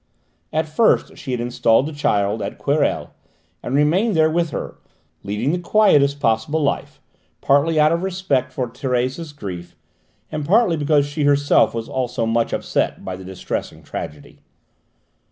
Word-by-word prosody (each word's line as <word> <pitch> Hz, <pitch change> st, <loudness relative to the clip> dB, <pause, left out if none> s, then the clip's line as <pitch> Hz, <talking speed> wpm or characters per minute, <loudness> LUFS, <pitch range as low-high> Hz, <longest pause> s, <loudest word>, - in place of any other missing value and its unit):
At 160 Hz, 0 st, 0 dB
first 185 Hz, +9 st, +2 dB
she 145 Hz, -5 st, -10 dB
had 125 Hz, -2 st, -1 dB
installed 120 Hz, 0 st, +2 dB
the 155 Hz, -, -5 dB
child 105 Hz, -7 st, 0 dB
at 100 Hz, -, -5 dB
Querelles, -, -, 0 dB, 0.5 s
and 130 Hz, -, -3 dB
remained 175 Hz, +9 st, +2 dB
there 160 Hz, 0 st, +4 dB
with 170 Hz, 0 st, +1 dB
her, -, -, -6 dB, 0.4 s
leading 105 Hz, +7 st, -1 dB
the 175 Hz, -, -1 dB
quietest 150 Hz, -8 st, +3 dB
possible 115 Hz, +7 st, +1 dB
life, 140 Hz, -, -2 dB, 0.4 s
partly 150 Hz, +3 st, +2 dB
out 150 Hz, +1 st, +5 dB
of 170 Hz, +1 st, 0 dB
respect 175 Hz, -9 st, -1 dB
for 130 Hz, -1 st, -2 dB
Thérèse's 130 Hz, +5 st, -2 dB
grief, 90 Hz, -10 st, -8 dB, 0.6 s
and 150 Hz, -, -3 dB
partly 190 Hz, +2 st, +3 dB
because 145 Hz, -1 st, +2 dB
she 145 Hz, +1 st, -2 dB
herself 145 Hz, -3 st, +3 dB
was 115 Hz, 0 st, -4 dB
also 125 Hz, -2 st, -2 dB
much 115 Hz, +1 st, 0 dB
upset -, -, -1 dB
by 95 Hz, -, -4 dB
the 95 Hz, -, -10 dB
distressing 95 Hz, 0 st, -5 dB
tragedy. 75 Hz, -1 st, -8 dB
140 Hz, 155 wpm, -21 LUFS, 115-160 Hz, 0.6 s, out